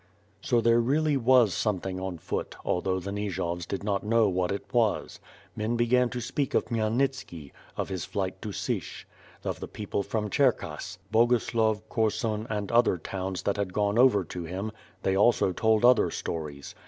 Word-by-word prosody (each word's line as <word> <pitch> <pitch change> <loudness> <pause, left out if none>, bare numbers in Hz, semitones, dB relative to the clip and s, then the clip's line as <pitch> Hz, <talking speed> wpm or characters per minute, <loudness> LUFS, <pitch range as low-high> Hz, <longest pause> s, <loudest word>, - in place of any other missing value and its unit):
So 120 0 +2
there 115 0 +4
really 145 +5 +2
was 125 -5 +4
something 95 -1 -1
on 95 -2 -4
foot, - - -4
although 95 +1 0
the 100 +2 -5
Nijovs 90 -4 -3
did 100 - -4
not 100 -2 -1
know 110 +1 +3
what 90 -1 0
it 100 - -3
was. 115 -4 +1 0.4
Men 110 +2 -1
began 125 +1 +3
to 125 - -4
speak 135 +3 -2
of - - +2
Khmyel 110 -2 -1
nitski; 120 - -2 0.3
of - - -2
his 95 -2 -3
flight 95 -1 -3
to 105 - -5
Sich; - - -4 0.4
of - - -3
the - - -6
people 105 -1 -3
from 105 +1 -3
Cherkass; 135 -4 0
Boguslav, 110 -2 +2
Korsun 110 0 -1
and 105 -2 -3
other 115 -5 +4
towns 95 +2 -4
that 100 - 0
had 100 -3 -2
gone 105 +2 +1
over 120 -6 +5
to 90 +1 -6
him 95 +6 -4 0.2
— 95 - -31
they 95 - +1
also 100 -1 +4
told 110 +4 +2
other 125 0 +5
stories. 75 -4 -5
105 Hz, 180 wpm, -28 LUFS, 95-115 Hz, 0.4 s, over